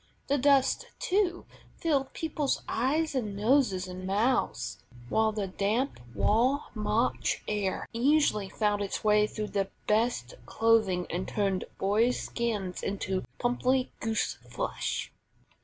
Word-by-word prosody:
The 285 0 +3
dust, 270 0 +3
too, 370 -2 0 0.3
filled 280 -5 0
people's 300 -3 -1
eyes 300 +6 +1
and 215 -7 -2
noses 210 -5 +2
and 185 +1 -6
mouths, 195 - 0 0.3
while 220 +6 +3
the 210 -2 -2
damp 205 - -1 0.2
raw 255 +7 +3
March 215 +2 0
air 205 -3 -1
easily 235 -5 +2
found 210 -1 0
its 200 - -3
way 210 0 +4
through 215 0 -4
the 195 -1 -1 0.2
best 215 - +1
clothing, 220 -5 +3
and 180 +2 -2
turned 195 -3 0
boys' 220 +6 +2
skins 210 -6 -2
into 190 -1 -2
pimply 255 +1 +1
goose 225 -1 -1
flesh. - - -3
220 Hz, 125 wpm, -29 LUFS, 200-260 Hz, 0.3 s, way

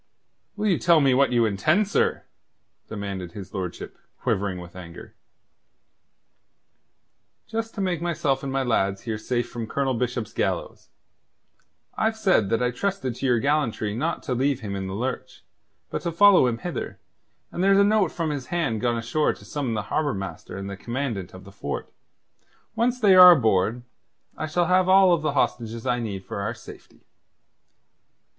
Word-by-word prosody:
"Will 210 0 -3
you 195 -5 +2
tell 170 -2 +5
me 135 -3 +3
what 135 +1 +3
you 120 -2 +3
intend, 155 - +2
sir?" - - 0 0.6
demanded 100 -4 -6
his 95 -2 -9
lordship, 95 -3 -6 0.2
quivering 95 -2 -1
with 90 0 -11
anger. 85 -2 -11 2.3
"Just 225 0 -4
to 200 - -3
make 180 -4 -1
myself 155 -6 0
and 135 - -4
my 135 0 0
lads 100 -5 0
here 110 -2 -3
safe 120 +2 -2
from 115 -2 -6
Colonel 135 +2 -1
Bishop's 120 -2 -3
gallows. - - -3 1.1
I've 220 0 0
said 185 - +2
that 115 +2 +1
I 125 - +1
trusted 185 -1 -2
to 135 +3 -3
your 120 -2 +3
gallantry 125 -6 0
not 155 +8 -2
to 130 - -2
leave 135 +2 0
him 100 -3 -5
in 95 -1 -4
the 95 - -5
lurch, 125 +5 -5 0.5
but - - -3
to 170 - -2
follow 190 -4 +6
him 115 -2 -1
hither, 175 +9 -5 0.5
and 175 - -2
there's 195 0 +5
a 200 - +6
note 205 -4 +2
from 165 -3 -2
his 140 -4 -5
hand 160 -11 -1
gone 120 -1 +1
ashore 120 +7 0
to - - -16
summon 135 -6 -3
the 105 - -2
Harbour 150 -2 0
Master 95 -1 -7
and 100 0 -6
the 100 - -5
Commandant 115 -5 -4
of 95 - -11
the 100 - -13
fort. 70 -7 -6 0.8
Once 240 +2 +1
they 205 -5 +5
are 180 -1 +10
aboard, 110 - +1 0.5
I 155 - -4
shall 175 +3 +1
have 185 +1 +3
all 190 -2 +6
the 150 -2 -1
hostages 115 -4 -1
I 125 -1 +1
need 100 -5 -5
for 100 - -5
our 105 +4 -3
safety." 110 - -14
125 Hz, 175 wpm, -24 LUFS, 105-170 Hz, 2.3 s, are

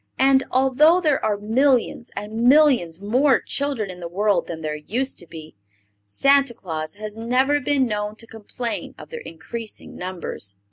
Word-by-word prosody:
And, 265 0 +4
although 270 +7 +4
there 305 -6 +1
are 210 -1 +1
millions 240 +3 +1
and 210 +1 -6
millions 245 - +4
more 250 +7 +3
children 275 -9 -2
in 180 - -11
the 170 - -5
world 195 +1 +1
than 160 -1 -6
there 155 -1 -3
used 245 - -3
to 175 - -8
be, 160 -1 -11 0.5
Santa 275 - +3
Claus 160 -6 -5
has 215 +1 -7
never 260 +5 +2
been 275 0 +2
known 210 -2 -3
to 230 - -8
complain 225 +2 -6
of - - -12
their 475 0 -7
increasing 210 +7 -8
numbers. 175 - -5
225 Hz, 160 wpm, -22 LUFS, 185-270 Hz, 0.5 s, And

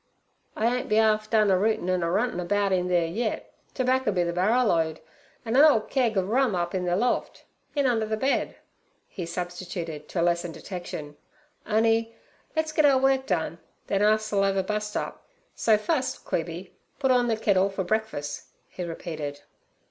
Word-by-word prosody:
'I 230 +3 +1
ain't 250 - -5
be 215 - +3
'arf 215 -1 +2
done 215 -3 +4
a 185 - +4
rootin' 215 -3 +1
an' 185 -1 +1
a 170 - 0
runtin' 205 +2 0
about 200 +3 0
in 180 -1 +1
theere 175 -2 +2
yit. 215 +8 -3 0.2
Terbaccer 255 -2 +1
b' 180 -3 +1
ther 170 0 -2
barrerload, 180 -5 +2 0.5
an' 225 +1 -1
a 275 - +7
'ole 295 -8 +6
keg 235 -2 0
ov 190 -1 +1
rum 245 -1 +2
up 175 -1 -2
in 185 -1 -1
ther 175 0 +1
loft—in 250 +5 -2
under 225 -4 +1
the 220 0 -1
bed' 270 +5 0 0.5
he 175 -4 -6
substituted, 175 -3 -5
to 180 - -3
lessen 170 0 +1
detection. 160 -5 -7 0.5
'On'y 225 +1 +2 0.4
let's 315 0 0
git 310 0 +2
our 280 -2 +6
work 265 0 +2
done, 170 -2 -1 0.3
then 195 0 0
us'll 215 -1 +2
ev 195 0 +1
a 190 - +2
bust 210 +1 -2
up; - - -5 0.3
so 220 -2 +3
fust, 260 +4 -2
Queeby, 170 +2 -3 0.3
put 265 -2 +2
orn 245 -1 +3
ther 225 - +2
kittle 200 -3 +2
for 195 -1 -3
breakfuss' 215 -7 -2 0.2
he 180 - -6
repeated. 155 -4 -5
205 Hz, 180 wpm, -26 LUFS, 175-230 Hz, 0.5 s, a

